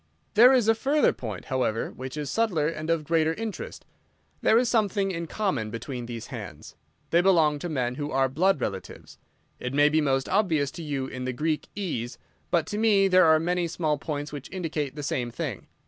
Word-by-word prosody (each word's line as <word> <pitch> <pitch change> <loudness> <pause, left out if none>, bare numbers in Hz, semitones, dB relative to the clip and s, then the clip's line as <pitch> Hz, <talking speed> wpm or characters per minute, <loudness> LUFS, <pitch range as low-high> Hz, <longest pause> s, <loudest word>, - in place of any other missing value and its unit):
"There 240 +4 +8
is 250 -5 +3
a 225 - +6
further 280 +6 +2
point, 110 -7 -6
however, 125 -4 -1
which 130 +3 -7
is 145 -2 -3
subtler 200 -10 +1
and 155 0 -4
of 165 -2 +1
greater 160 +1 +1
interest. 220 -2 -6 0.6
There 220 - +4
is 245 +1 +3
something 205 -4 +1
in 170 -2 -4
common 150 - -1
between 120 +2 -6
these 115 -1 -6
hands. 95 -10 -8 0.4
They 170 - +5
belong 160 -6 +3
to 175 - -4
men 125 -5 -1
who 145 - -2
are 135 -1 +2
blood 165 +6 +2
relatives. 95 -6 -6 0.4
It 125 +2 -4
may 145 +1 +5
be 155 +1 +2
most 135 -2 +1
obvious 165 -9 +1
to 170 - -8
you 140 -4 -3
in 130 -1 -6
the 130 - -2
Greek 155 +4 -1
e's, 125 - -3 0.3
but 170 -3 +2
to 210 - -4
me 205 -3 +4
there 185 -1 +6
are 160 -1 +6
many 175 +1 0
small 155 -3 -1
points 145 -1 -4
which 145 -2 -7
indicate 155 -7 -3
the 150 - -6
same 125 -3 -1
thing. - - -5
155 Hz, 200 wpm, -26 LUFS, 130-185 Hz, 0.6 s, There